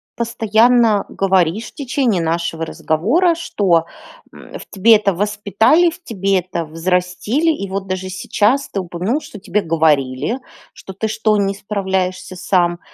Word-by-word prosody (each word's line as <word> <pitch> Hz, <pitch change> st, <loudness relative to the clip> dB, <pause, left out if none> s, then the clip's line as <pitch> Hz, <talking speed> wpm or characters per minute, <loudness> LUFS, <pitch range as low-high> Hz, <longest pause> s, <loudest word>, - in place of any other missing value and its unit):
постоянно 230 Hz, -1 st, +2 dB
говоришь, 190 Hz, +2 st, +1 dB
в -, -, -26 dB
течение 260 Hz, -, 0 dB
нашего 165 Hz, 0 st, -2 dB
разговора, 235 Hz, -, +1 dB
что, 185 Hz, -, +1 dB, 0.5 s
м, -, -, -11 dB
в -, -, -11 dB
тебе 220 Hz, +3 st, +5 dB
это 205 Hz, -2 st, +1 dB
воспитали, 210 Hz, -, +2 dB
в 355 Hz, +2 st, -14 dB
тебе 195 Hz, -, 0 dB
это 175 Hz, -2 st, -4 dB
взрастили. 180 Hz, -, 0 dB
И 200 Hz, -11 st, -4 dB
вот 195 Hz, 0 st, -3 dB
даже 185 Hz, 0 st, -4 dB
сейчас 215 Hz, +8 st, 0 dB
ты 200 Hz, -, -3 dB
упомянул, 185 Hz, -, -2 dB
что 210 Hz, -, -11 dB
тебе 210 Hz, +1 st, -1 dB
говорили, 155 Hz, -, 0 dB, 0.3 s
что: 190 Hz, -, -11 dB
"Ты 220 Hz, +4 st, -3 dB
что, 215 Hz, 0 st, +1 dB
не 195 Hz, -1 st, 0 dB
справляешься 190 Hz, -2 st, -3 dB
сам?" 175 Hz, -1 st, 0 dB
195 Hz, 145 wpm, -18 LUFS, 180-225 Hz, 0.5 s, тебе